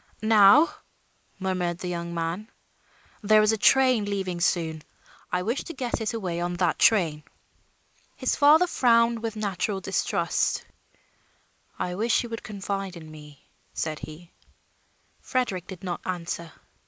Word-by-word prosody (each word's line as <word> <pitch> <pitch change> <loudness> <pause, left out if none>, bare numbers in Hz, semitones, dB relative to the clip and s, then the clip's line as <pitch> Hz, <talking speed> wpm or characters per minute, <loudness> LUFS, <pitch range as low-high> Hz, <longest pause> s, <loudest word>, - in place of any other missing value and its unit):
"Now," 220 +8 +7 0.7
murmured 180 -3 -2
the 180 - -6
young 170 -1 -4
man. 170 +5 -3 0.7
"There 215 0 +5
is 215 - +4
a - - +1
train 255 -3 +4
leaving 190 -3 -3
soon. 165 -3 0 0.5
I 180 0 0
wish 235 +7 -2
to 335 - -8
get 250 -3 -3
it 220 +1 -2
away 180 -6 -3
on 175 0 -2
that 175 0 0
train." 170 -9 +3 0.9
His 260 - -1
father 305 +4 +6
frowned 230 -7 +3
with 225 -1 -4
natural 200 -1 -2
distrust. 190 - -1 1.1
"I 180 - -3
wish 225 +6 +1
you 240 - -7
would 230 0 -5
confide 195 -2 -5
in 160 -2 -11
me," 150 -2 -14 0.3
said 155 -1 -3
he. 165 +3 -11 0.9
Frederick 235 -9 -2
did 190 -1 -10
not 180 -2 -4
answer. 170 -2 -4
195 Hz, 140 wpm, -26 LUFS, 175-225 Hz, 1.1 s, Now